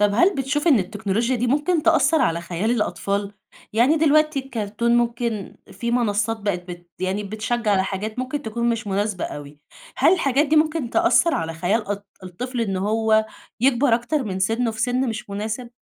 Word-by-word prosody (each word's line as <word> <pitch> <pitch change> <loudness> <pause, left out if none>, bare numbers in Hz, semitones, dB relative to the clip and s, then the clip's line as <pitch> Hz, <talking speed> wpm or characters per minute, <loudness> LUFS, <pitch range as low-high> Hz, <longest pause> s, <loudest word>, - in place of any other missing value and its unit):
طب 205 -1 +3
هل 355 - +4
بتشوف 290 +3 -1
إن 275 - +6
التكنولوجيا 215 +5 -1
دي 245 +2 -1
ممكن 300 +5 +1
تأثر 325 -1 +3
على 170 0 +1
خيال 175 +6 -2
الأطفال؟ 205 -3 -1 0.4
يعني 250 +8 +4
دلوقتي 305 -1 +3
الكارتون 235 -2 -1
ممكن 235 -3 -2 0.2
في 235 - -3
منصات 225 -2 0
بقيت 185 -3 -3
بت 175 0 -10
يعني 190 +3 -1
بتشجع 220 +2 -2
على 190 -1 +3
حاجات 210 +4 -4
ممكن 260 +3 -3
تكون 235 +1 -2
مش 230 -2 -3
مناسبة 200 -1 -1
أوي، 145 0 -8 0.4
هل - - +5
الحاجات 285 -4 +2
دي 310 +2 +2
ممكن 305 -5 +1
تأثر 340 +1 +3
على 165 0 -2
خيال 195 +7 0
أط 205 0 -4 0.2
الطفل 240 +8 -5
إن 195 -4 -1
هو 220 +2 +2 0.3
يكبر 255 -1 +3
أكتر 255 +4 -1
من 190 -2 -3
سِنّه 225 +5 +1
في 220 0 -7
سن 250 +1 +1
مش 215 -2 -5
مناسب؟ 220 +4 -4
225 Hz, 180 wpm, -22 LUFS, 200-255 Hz, 0.4 s, إن